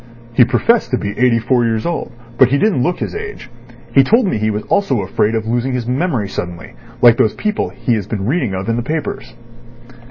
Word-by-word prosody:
"He 125 - +6
professed 225 - +2
to 125 - 0
be 100 - -3
eighty 120 +2 +2
four 120 +2 +1
years 115 -1 -1
old, 170 -1 -3 0.3
but 130 - +7
he 140 - +2
didn't 170 - +2
look 175 +7 0
his - - -4
age. 430 - -7 0.4
He 135 - +6
told 230 - +3
me 185 - -1
he 110 +1 0
was 105 0 -2
also 135 - +1
afraid 105 +3 0
of 110 -1 -2
losing 120 +3 -1
his 125 -2 -2
memory 125 - -1
suddenly, 90 -4 -6 0.3
like 120 -1 +7
those 110 - +2
people 210 -1 -2
he 125 - -2
has 105 -3 -2
been 105 -3 -3
reading 125 - 0
of 95 0 -4
in 115 0 0
the - - 0
papers." 155 +5 -4
120 Hz, 220 wpm, -17 LUFS, 110-155 Hz, 0.4 s, but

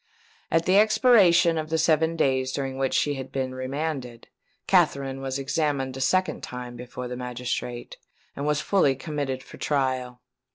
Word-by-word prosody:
At 165 +1 +1
the 190 +2 +5
expiration 210 -7 +5
of 155 0 -5
the 160 - +1
seven 160 0 +2
days 130 -4 +1
during 135 -1 -3
which 135 -1 0
she 145 - +2
had 135 -2 -7
been 130 -1 -2
remanded, 130 -2 -4 0.4
Katherine 135 -1 +2
was 135 0 -3
examined 140 -1 -1
a 135 - -5
second 185 +8 +1
time 125 -1 -7
before 125 +1 -7
the 125 - -5
magistrate, 125 -1 -5 0.4
and 140 +1 -3
was 150 0 +1
fully 165 -9 +2
committed 135 -2 -4
for 125 - -13
trial. 130 -3 -1
135 Hz, 160 wpm, -25 LUFS, 130-160 Hz, 0.4 s, the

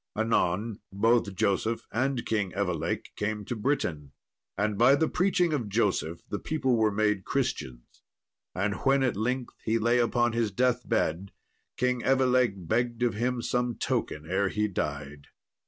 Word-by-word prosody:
Anon 110 -1 0
both 100 0 +2
Joseph 110 +3 0
and 130 +1 -1
King 105 -5 -1
Evelake 90 -5 -2
came 105 0 -3
to 120 - -3
Britain, 85 - -2 0.4
and 105 +1 0
by 120 +6 +6
the 160 +2 +1
preaching 180 -2 +1
of 120 -8 -2
Joseph 95 -6 0
the 100 - -3
people 135 -5 0
were 110 -1 +3
made 105 -1 +1
Christians. - - -3 0.5
And 100 +2 0
when 135 0 +2
at 125 - +1
length 125 +4 -2
he 115 +1 +1
lay 120 +2 +2
upon 120 0 +2
his 115 -2 +1
death 125 +4 0
bed, 90 +5 0 0.5
King 125 0 +1
Evelake 125 -8 +2
begged 120 +3 0
of 120 -2 +2
him 120 +2 -1
some 125 -1 0
token 75 0 -2
ere 95 +3 +1
he 105 +2 0
died. 70 -6 -4
110 Hz, 155 wpm, -28 LUFS, 100-125 Hz, 0.5 s, by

